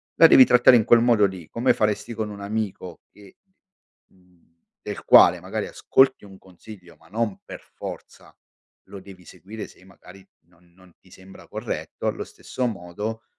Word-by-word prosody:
la 165 - +7
devi 130 - +7
trattare 125 0 +5
in 110 -3 +2
quel 120 -1 +5
modo 115 -3 +3
lì, 95 -5 -6
come 120 +3 +1
faresti 105 +2 -2
con 110 -1 -4
un 100 -1 -10
amico 100 -4 -6
che, 100 -2 -19 0.7
mhmm, 90 -2 -29 0.4
del - - -8
quale - - +6
magari - - -5
ascolti 130 -5 +1
un 95 -1 -15
consiglio 90 -1 -16
ma - - -24
non 110 -1 -3
per - - -10
forza - - -11 0.5
lo 100 - -11
devi 95 -1 -15
seguire 100 +4 -10
se - - -21
magari 95 0 -18 0.2
non 85 0 -29
non 95 -1 -22
ti 95 - -25
sembra 95 +1 -16
corretto, - - -7
allo - - -3
stesso 130 -1 -5
modo, 105 +2 -6
100 Hz, 165 wpm, -22 LUFS, 90-110 Hz, 0.7 s, la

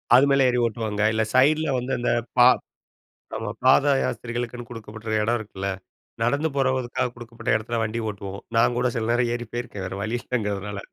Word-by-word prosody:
அது 135 +3 +7
மேல 140 -1 +4
ஏறி 125 0 +1
ஓட்டுவாங்க. 110 -2 -2
இல்ல 110 0 +2
சைட்ல 155 +4 +4
வந்து 125 +2 -4
அந்த 120 - +1 0.3
பா 120 - +9 0.9
ஆமா 110 -2 -3
பாத 140 +2 +6
யாஸ்திரிகளுக்குன்னு 120 0 -4
கொடுக்கப்படுற 110 -1 -7
இடம் 120 +2 +1
இருக்குல்ல. 100 -2 -5 0.5
நடந்து 140 +7 +1
போறவதுக்காக 130 -2 0
கொடுக்கப்பட்ட 120 -1 -5
இடத்துல 115 +1 -2
வண்டி 110 +2 -3
ஓட்டுவோம். 100 0 -7 0.2
நான் 120 +1 +3
கூட 125 - +1
சில 110 0 -1
நேரம் 120 0 +2
ஏறி 120 -1 -4
போயிருக்கேன் 120 -5 -5
வேற 95 - -5
வழி 115 +3 -1
இல்லைங்கிறதுனால. 105 -4 -3
120 Hz, 165 wpm, -24 LUFS, 110-125 Hz, 0.9 s, பா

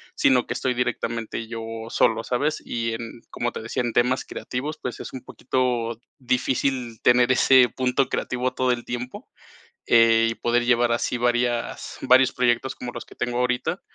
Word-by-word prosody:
sino 125 -2 +3
que - - -3
estoy 130 - -1
directamente 115 -2 -3
yo 115 0 -6 0.3
solo, 115 -1 +2
¿sabes? 145 +5 -1
Y, 115 -1 -2
en, 115 0 -7
como 120 0 -2
te - - -6
decía, 115 - -2
en 120 -1 -2
temas 125 +2 +2
creativos, 145 +5 -5
pues, 125 - -5
es - - -8
un 130 - -6
poquito 120 -3 -2 0.2
difícil 125 -1 -1
tener 125 +1 +4
ese 130 -1 +5
punto 130 +2 0
creativo 125 0 -2
todo 130 -1 +1
el 120 -1 -6
tiempo, 125 +1 -6 0.6
eh, 115 -1 +5
y - - -3
poder 120 +1 +1
llevar 120 0 +3
así 120 +1 -1
varias 120 0 -1
varios 130 0 +5
proyectos 125 +1 +1
como 125 - -6
los 120 - -7
que - - -15
tengo 120 0 -2
ahorita. 125 0 -1
120 Hz, 170 wpm, -24 LUFS, 120-125 Hz, 0.6 s, ese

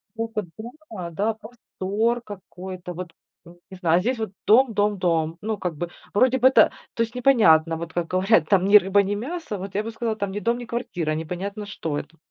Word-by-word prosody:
Стока 225 -1 -3 0.2
думала, 225 - -8
да. 210 +6 0
Простор 225 0 -3
какой-то, 185 -3 -8
вот, 175 -1 -7 0.3
э, 170 - -13 0.2
не 190 - -9
знаю. 170 -1 +3
А - - 0
здесь 245 +6 -1
вот 220 -4 -4
дом, 240 +4 +5
дом, 205 -1 +1
дом. 165 -2 0
Ну, 215 0 -3
как 175 -4 -3
бы, 175 +3 -4 0.2
вроде 255 +5 +4
бы, 260 - +6
это 265 - +5 0.2
то 230 - +1
есть 230 +1 -4
непонятно, 190 -11 +4
вот 165 0 -6
как 175 -1 -1
говорят, 185 -3 +3
там: 190 -2 +4
ни 205 - +7
рыба 200 0 +5
ни 200 +1 -2
мясо, 265 - -5
вот 195 +1 -7
я 205 - 0
бы 225 - -5
сказала, 225 -1 -3
там: 200 -2 -3
ни 205 - -4
дом, 235 +2 0
ни 245 - -6
квартира, 200 -10 -3
а - - -1
непонятно, 190 +6 -5
что 160 -7 -4
это. 160 +3 -8
205 Hz, 220 wpm, -24 LUFS, 175-225 Hz, 0.3 s, ни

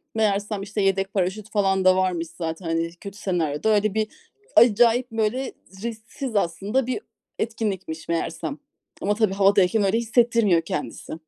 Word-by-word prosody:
Meğersem, 205 -1 0
işte, 205 +1 -3
yedek 195 0 +1
paraşüt 195 +2 -1
falan 195 -3 +1
da 185 0 +7
varmış 180 -3 0
zaten, 165 +1 -4
hani, 165 0 -1
kötü 200 +3 -10
senaryoda 175 -2 -1
öyle 210 -1 +1
bir, 215 0 0 0.5
acayip 235 +2 +5
böyle 225 +4 -1 0.3
risksiz 230 +2 -5
aslında 200 +7 0
bir 255 +10 -2 0.4
etkinlikmiş 195 -8 -3
meğerse. 165 -1 -2 0.5
Ama 205 +2 +1
tabii, 215 -3 +2
havadayken 200 +1 +4
öyle 195 +3 +2
hissettirmiyor 230 -6 +3
kendisi. 150 -1 -5
200 Hz, 140 wpm, -24 LUFS, 185-220 Hz, 0.5 s, da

